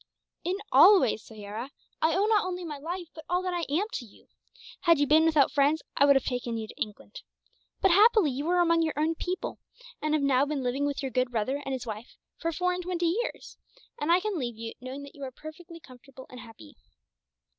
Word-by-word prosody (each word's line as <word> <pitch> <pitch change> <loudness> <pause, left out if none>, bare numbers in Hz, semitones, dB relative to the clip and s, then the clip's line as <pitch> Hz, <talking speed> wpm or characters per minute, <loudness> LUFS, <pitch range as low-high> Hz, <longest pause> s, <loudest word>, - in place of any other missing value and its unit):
"In 360 +2 -1 0.2
all 405 -1 +8
ways, 230 -5 0
Soyera. 220 +3 -8 0.3
I 320 0 +3
owe 395 +2 +2
not 430 -1 +3
only 360 -1 -4
my 300 -3 -6
life, 345 +3 -5
but 315 - -10
all 360 +1 +1
that 365 -1 -2
I 345 -1 -1
am, 345 +8 +1
to - - -3
you. 215 - -19 0.5
Had 335 -3 +4
you 290 - +2
been 310 +3 +5
without 305 -4 +4
friends, 290 +3 +2
I 280 - +5
would 280 -1 +6
have 270 - +2
taken 245 -2 -2
you 220 -1 -5
to - - -12
England. 210 0 -6 0.6
But 385 - +4
happily 410 - +5
you 285 +6 -3
are 360 0 +3
among 335 -1 +3
your 320 -2 -1
own 310 +2 +1
people, 360 +3 -4 0.4
and 305 0 +1
have 300 - 0
now 270 -1 +3
been 290 -3 -2
living 265 +3 0
with 285 -1 -3
your 265 - -3
good 255 -1 +1
brother 245 +4 -2
and 270 - -5
his 260 - -4
wife 220 +1 -8 0.2
for 330 - -1
four 360 +3 0
and 360 - -3
twenty 350 -1 -1
years; - - -7 0.4
and 295 +3 0
I 350 - +6
can 405 -2 -3
leave 240 -4 -4
you, 225 0 -6
knowing 260 +3 -7
that 280 - -11
you 285 - -15
are 260 - -5
perfectly 320 +5 -11
comfortable 260 -1 -14
and 250 - -10
happy. 225 - -14
295 Hz, 230 wpm, -28 LUFS, 255-345 Hz, 0.6 s, all